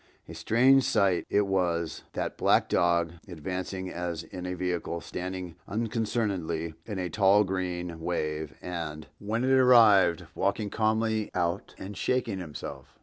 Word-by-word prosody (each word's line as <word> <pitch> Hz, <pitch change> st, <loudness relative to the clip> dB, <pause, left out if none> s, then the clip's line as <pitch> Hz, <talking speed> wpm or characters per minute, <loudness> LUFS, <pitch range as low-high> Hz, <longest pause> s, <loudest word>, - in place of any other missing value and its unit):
A 85 Hz, -, -9 dB
strange 120 Hz, +11 st, +4 dB
sight 100 Hz, -7 st, +2 dB
it 100 Hz, 0 st, +3 dB
was—that 85 Hz, -4 st, -2 dB
black -, -, +3 dB
dog 85 Hz, -1 st, +2 dB
advancing 95 Hz, +2 st, -5 dB
as 85 Hz, -2 st, -4 dB
in 90 Hz, -1 st, -7 dB
a 90 Hz, -, -3 dB
vehicle, 90 Hz, -1 st, -2 dB
standing 90 Hz, -1 st, -6 dB
unconcernedly 105 Hz, -7 st, -2 dB
in 105 Hz, -3 st, -4 dB
a 90 Hz, -1 st, -2 dB
tall 100 Hz, +4 st, +4 dB
green 90 Hz, -3 st, -3 dB
wave 80 Hz, -2 st, -3 dB
and, 85 Hz, -3 st, -5 dB
when 110 Hz, +4 st, -2 dB
it 130 Hz, -, +2 dB
arrived, 110 Hz, -9 st, +6 dB
walking 100 Hz, +2 st, -1 dB
calmly 110 Hz, 0 st, +1 dB
out 90 Hz, +1 st, -1 dB
and 100 Hz, +2 st, -7 dB
shaking 120 Hz, -5 st, -1 dB
himself! 80 Hz, -5 st, -8 dB
95 Hz, 135 wpm, -28 LUFS, 85-105 Hz, -, arrived